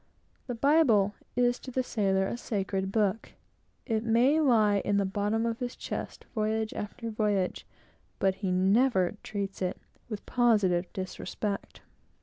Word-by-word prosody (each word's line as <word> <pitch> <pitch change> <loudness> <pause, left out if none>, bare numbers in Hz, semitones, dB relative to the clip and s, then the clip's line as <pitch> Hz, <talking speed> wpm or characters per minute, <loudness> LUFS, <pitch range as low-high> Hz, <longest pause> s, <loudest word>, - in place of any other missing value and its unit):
The 245 - -3
Bible 230 -7 +4 0.2
is 245 0 +2
to - - -9
the 255 0 -1
sailor 195 -5 +1
a 195 - -2
sacred 195 -4 -2
book. 210 0 0 0.5
It 220 -3 0
may 240 +7 +4
lie 220 -8 +4
in 205 - +1
the 200 - +2
bottom 205 +3 0
of 230 0 -2
his 245 -1 -4
chest, - - -6
voyage 220 -1 -1
after 225 +2 -5
voyage; 205 -4 -1 0.5
but 195 -1 +2
he 190 -3 0
never 190 +1 +3
treats 200 -2 -5
it 180 -1 -2 0.3
with 215 -3 -6
positive 205 -8 +2
disrespect. 200 +2 -4
215 Hz, 140 wpm, -29 LUFS, 195-235 Hz, 0.5 s, Bible